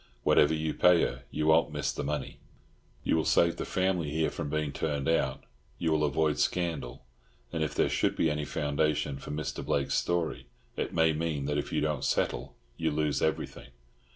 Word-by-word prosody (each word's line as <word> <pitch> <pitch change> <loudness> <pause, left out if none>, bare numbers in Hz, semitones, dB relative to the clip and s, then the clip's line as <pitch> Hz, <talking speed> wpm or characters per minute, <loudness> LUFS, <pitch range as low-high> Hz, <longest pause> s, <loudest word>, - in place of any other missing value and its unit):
Whatever 75 +2 +4
you 80 0 -1
pay 90 -1 +5
her, 60 +1 -3
you 75 0 -2
won't 80 0 +4
miss 75 -2 -1
the - - -4
money. 75 -1 -3 0.6
You - - +2
will 80 - +2
save 85 +1 +3
the - - -3
family 95 -4 0
here 80 +2 0
from 75 - -4
being 75 -1 -1
turned 70 -2 -2
out; 80 - +1 0.3
you 80 - 0
will 75 -1 +2
avoid 75 +1 +1
scandal; 75 -8 -1 0.5
and 80 -2 0
if 75 - -3
there - - +3
should - - +1
be - - +2
any 75 -1 -1
foundation 75 -1 -1
for - - -9
Mr. 75 +1 -3
Blake's 70 -1 0
story, 85 -6 -1 0.3
it - - -2
may 80 -1 +3
mean 75 -3 -2
that 75 0 0
if - - -5
you - - 0
don't 75 -3 -1
settle 65 +4 -1 0.2
you 80 -1 0
lose 75 -1 0
everything." 80 -4 -2
75 Hz, 190 wpm, -29 LUFS, 75-80 Hz, 0.6 s, pay